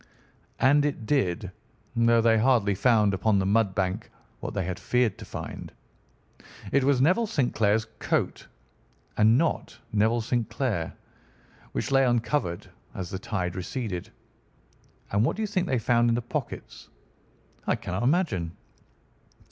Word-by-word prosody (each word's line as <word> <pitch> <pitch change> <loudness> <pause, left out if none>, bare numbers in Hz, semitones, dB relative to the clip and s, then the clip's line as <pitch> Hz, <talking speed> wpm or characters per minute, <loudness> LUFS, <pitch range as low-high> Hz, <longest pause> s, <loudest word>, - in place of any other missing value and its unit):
"And 145 +2 +5
it 145 -6 -2
did, 100 -7 0 0.4
though 115 0 +4
they 115 -1 +4
hardly 110 -4 +3
found 105 -1 +3
upon 100 +2 +2
the 95 - +1
mud 100 -1 +2
bank 95 -2 -1 0.3
what - - -6
they 95 -3 -1
had 90 0 -4
feared 120 +1 +1
to - - -8
find. - - -7 1.0
It 140 - +3
was 135 -1 +3
Neville 185 - +3
St. 145 - 0
Clair's 110 +1 +2
coat, - - -1 0.7
and 110 +3 +5
not 165 +3 -1 0.2
Neville 110 +3 +2
St. 120 0 -1
Clair, 105 -12 -2 0.8
which 140 - -2
lay 135 0 +5
uncovered 120 -6 0 0.3
as 90 -3 -5
the 95 - -4
tide 95 -5 -3
receded. 95 -1 -4 1.0
And 100 +2 +2
what - - +1
do 220 - -2
you - - 0
think 185 -3 -1
they 130 - +1
found 120 0 +3
in 115 - +2
the 120 - -1
pockets?" 120 - -6 0.8
"I - - +3
cannot 90 +4 -4
imagine." 120 - 0
115 Hz, 150 wpm, -27 LUFS, 100-130 Hz, 1.0 s, And